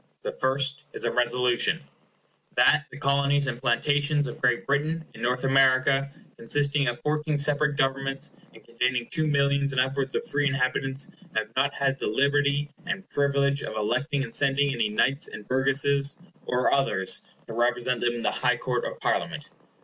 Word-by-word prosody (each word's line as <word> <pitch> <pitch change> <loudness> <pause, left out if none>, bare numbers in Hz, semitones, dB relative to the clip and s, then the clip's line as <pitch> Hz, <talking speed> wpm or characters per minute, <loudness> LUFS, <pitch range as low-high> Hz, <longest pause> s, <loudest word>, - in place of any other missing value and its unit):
The - - -3
first 135 +2 0
is - - -5
a 120 - +1
Resolution— 125 0 +1 0.7
"That 150 - +4
the 135 - -11
Colonies 140 0 +2
and 125 -2 -4
Plantations 145 +4 +1
of 120 - -7
Great 120 -2 +1
Britain 155 +4 -1
in - - -12
North 125 +2 0
America, 135 +1 +3 0.3
consisting 140 +3 +1
of 120 0 -2
fourteen 150 0 -1
separate 145 0 +1
Governments, 135 0 -1 0.2
and - - -17
containing 120 +1 -1
two 155 -1 0
millions 140 -1 +1
and 130 - +1
upwards 135 +1 -1
of - - -1
free 145 -9 +1
inhabitants, 135 0 -1 0.2
have 110 0 -1
not 140 +2 +1
had 135 -1 0
the - - -2
liberty 140 +4 +1 0.2
and 195 +2 -4
privilege 140 0 +1
of - - -6
electing 140 +7 -1
and 115 -3 -8
sending 140 0 +2
any 115 -4 0
Knights 135 +7 +2
and 105 - -10
Burgesses, 140 +2 +2 0.3
or 125 0 +1
others, 95 -9 +2 0.2
to 115 - -8
represent 120 +1 0
them 120 0 +1
in 120 - -5
the - - +1
High - - +1
Court - - -2
of - - -6
Parliament." - - -2
135 Hz, 170 wpm, -26 LUFS, 125-140 Hz, 0.7 s, That